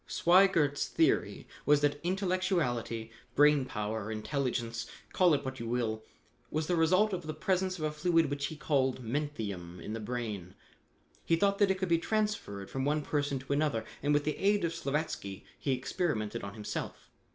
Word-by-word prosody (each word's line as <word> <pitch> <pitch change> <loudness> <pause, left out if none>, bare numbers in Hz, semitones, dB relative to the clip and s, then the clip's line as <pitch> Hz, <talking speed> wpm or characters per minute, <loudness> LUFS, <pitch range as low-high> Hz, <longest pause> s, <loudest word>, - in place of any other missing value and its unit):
"Sweigert's 170 -5 +4
theory - - +1 0.2
was 145 +1 +4
that 145 0 +1
intellectuality, 175 - 0 0.2
brain 145 -2 +5
power, 105 -2 -3
intelligence, 115 0 -2 0.3
call 180 -4 +5
it 140 0 -3
what 130 0 -4
you 115 - -4
will, 115 -2 -1 0.5
was 155 0 -1
the 175 - +1
result 185 +6 +3
of 175 -3 -4
the 155 - -3
presence 185 +3 0
of 155 - -5
a 155 - 0
fluid 165 -1 +2
which 140 0 -1
he 155 - -7
called 135 -4 0
'menthium' 110 - -4
in 105 - -6
the 115 - -3
brain. 105 -6 -4 0.7
He 165 - +3
thought 200 +3 +2
that 205 -2 +5
it 190 - +2
could 190 0 -1
be 165 -1 +4
transferred 210 - -1
from 135 - -2
one 150 +2 +1
person 145 -1 0
to 130 +2 -3
another, 140 -7 0 0.2
and 145 - +1
with 145 0 +3
the 150 - -1
aid 205 0 +2
of 165 - -1
Slavatsky, 140 - -3
he 140 - -1
experimented 125 - -2
on 100 +1 -6
himself. 105 -1 -6
145 Hz, 175 wpm, -31 LUFS, 115-170 Hz, 0.7 s, brain